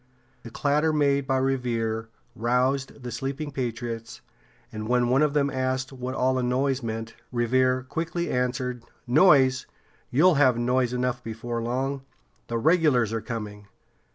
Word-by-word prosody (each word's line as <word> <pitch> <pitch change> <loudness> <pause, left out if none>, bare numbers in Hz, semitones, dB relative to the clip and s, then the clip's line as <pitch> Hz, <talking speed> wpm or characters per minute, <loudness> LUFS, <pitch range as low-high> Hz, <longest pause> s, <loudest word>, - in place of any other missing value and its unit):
The 120 - -9
clatter 150 +6 +1
made 140 -2 +1
by 135 -1 +2
Revere 115 -4 -1 0.3
roused 130 +3 0
the 120 - -5
sleeping 135 +5 -4
patriots, 120 -3 -5 0.5
and 110 0 -5
when 125 -1 +2
one 130 +3 +3
of 150 -1 +2
them 140 -1 +2
asked 130 0 -2
what 130 0 -5
all 130 0 +2
this 130 -1 0
noise 130 +2 0
meant, 115 -1 -5 0.2
Revere 130 +1 +2
quickly 165 +5 -3
answered: 125 0 -1 0.2
"Noise! 135 -2 +4 0.4
You'll 175 +8 +5
have 130 -4 +5
noise 125 +1 +1
enough 125 0 -2
before 115 +1 -4
long. 130 +4 -2 0.5
The 115 - -2
regulars 140 - +3
are 115 - -1
coming!" 105 -3 -6
125 Hz, 145 wpm, -26 LUFS, 120-135 Hz, 0.5 s, You'll